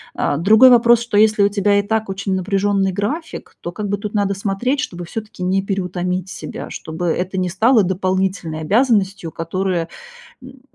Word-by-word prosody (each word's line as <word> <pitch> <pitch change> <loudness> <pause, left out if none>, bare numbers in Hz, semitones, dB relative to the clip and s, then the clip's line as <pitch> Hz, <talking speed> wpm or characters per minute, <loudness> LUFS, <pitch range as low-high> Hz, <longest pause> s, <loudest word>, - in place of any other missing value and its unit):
А, 145 - 0
другой 220 - +6
вопрос, 235 -1 +5
что 235 -3 -5
если 215 0 +4
у 200 - +4
тебя 205 0 +2
и - - 0
так 220 0 -2
очень 195 0 -3
напряженный 195 +1 0
график, 230 - -5
то 175 - -5
как 205 +3 -5
бы 205 +1 -1
тут 210 +1 -6
надо 200 -1 +1
смотреть, 200 +8 -1
чтобы 175 -12 -4
всё-таки 210 0 -7
не 190 +2 +1
переутомить 180 -2 -3
себя. - - -7
Чтобы 160 +2 -6
это 180 +3 -2
не 185 -1 0
стало 220 +5 +3
дополнительной 185 -3 -1
обязанностью, 200 - +1
которая, 170 +1 -2 0.5
м, 260 +1 -14
195 Hz, 175 wpm, -19 LUFS, 185-215 Hz, 0.5 s, другой